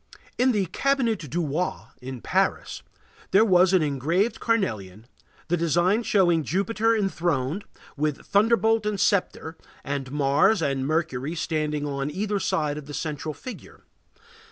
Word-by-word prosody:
In 255 +1 +4
the 205 -4 +1
Cabinet 230 - 0
du 170 +5 -1
Roi, 155 +6 -1 0.3
in 130 -1 -7
Paris, - - -1 0.5
there 200 +4 +5
was 185 -2 +4
an 185 -4 +4
engraved 155 - 0
carnelian, 110 - -2 0.4
the 175 - +1
design 175 +6 +2
showing 175 -8 +2
Jupiter 220 +7 +1
enthroned, 175 -3 -1 0.3
with 150 -1 -2
thunderbolt 225 +1 +2
and 210 -2 -2
sceptre, 180 -5 0 0.3
and 140 -2 -4
Mars 145 +9 +3
and 135 -4 -1
Mercury 155 -2 -1
standing 155 -2 -2
on 140 -1 -3
either 205 +5 -2
side 150 -5 -1
of 145 - -12
the 145 - -7
central 155 -1 -4
figure. 255 - -10
165 Hz, 135 wpm, -25 LUFS, 145-205 Hz, 0.5 s, there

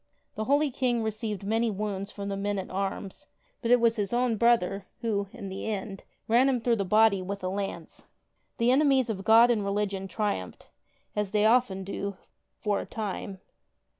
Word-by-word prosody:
The 215 - -3
holy 285 +2 +2
King 245 -2 0
received 215 -2 -3
many 225 +3 +1
wounds 200 -1 -3
from 200 -1 -6
the 200 - -2
men 200 +1 -2
at 190 - -5
arms, 195 0 -4 0.3
but 235 - -2
it 245 0 +6
was 230 -1 +3
his 205 -2 -1
own 240 -1 +1
brother 205 -4 +2
who, 205 -3 -1
in 200 - -8
the 190 +3 -5
end, 200 -2 -4 0.2
ran 245 +4 +4
him 255 -2 +1
through 235 0 +1
the 200 - 0
body 210 0 +4
with 195 +1 -5
a 185 - -1
lance. 195 +1 -5 0.5
The 235 +1 +3
enemies 265 -3 +3
of 195 -2 -5
God 230 +3 +6
and 215 -4 +1
religion 200 -1 -2
triumphed, 190 - -3 0.5
as 210 -1 -1
they 210 +1 +2
often 220 -5 +3
do' 200 0 -4 0.4
for 205 -2 0
a - - -5
time. 200 -3 -5
210 Hz, 185 wpm, -28 LUFS, 195-235 Hz, 0.5 s, it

